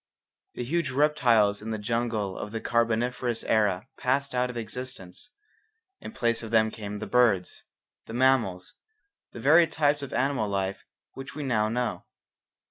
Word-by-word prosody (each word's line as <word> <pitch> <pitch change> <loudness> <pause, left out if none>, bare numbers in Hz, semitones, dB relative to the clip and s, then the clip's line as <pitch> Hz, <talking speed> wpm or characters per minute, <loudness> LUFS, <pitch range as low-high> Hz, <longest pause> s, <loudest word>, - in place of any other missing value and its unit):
The - - -3
huge 170 +7 -1
reptiles 120 -8 +3
in 110 - -6
the 110 - -2
jungle 110 -2 -2
of 105 - -6
the 115 - -3
Carboniferous 115 +1 0
era 105 -4 +1
passed 140 +2 0
out 125 0 +1
of 125 - -6
existence. 115 - -6 0.7
In - - -8
place 120 - 0
of 110 - -7
them 110 -1 +3
came 105 -1 -6
the 105 - -5
birds, 110 -7 +1 0.4
the 110 - -8
mammals, 120 -8 +2 0.6
the - - -9
varied 160 +7 +5
types 145 -1 +2
of 140 - -6
animal 135 -6 0
life 95 -1 -2 0.3
which 135 +1 -9
we 150 - -4
now 110 -5 +1
know. 115 -6 -2
115 Hz, 155 wpm, -27 LUFS, 105-130 Hz, 0.7 s, varied